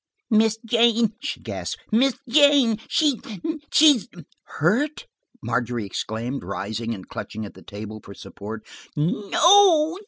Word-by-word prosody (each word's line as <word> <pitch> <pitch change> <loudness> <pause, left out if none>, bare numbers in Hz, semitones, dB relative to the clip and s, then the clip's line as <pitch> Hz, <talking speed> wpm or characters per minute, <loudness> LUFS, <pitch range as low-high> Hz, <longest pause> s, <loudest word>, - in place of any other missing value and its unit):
"Miss 220 0 +3
Jane," 230 -1 +3
she 285 - -5
gasped, - - -6
"Miss 250 +4 +3
Jane, 275 -4 +4
she's–she's–" 295 - +1 0.5
"Hurt!" 255 - 0 0.4
Margery 120 -2 -2
exclaimed, 115 +6 -4
rising 105 +5 -4
and 95 - -12
clutching, 110 0 -7
at 100 - -10
the - - -15
table 110 +1 -9
for 100 - -12
support. 105 +2 -9 0.3
"No. 320 - +4
220 Hz, 115 wpm, -23 LUFS, -, 0.5 s, Jane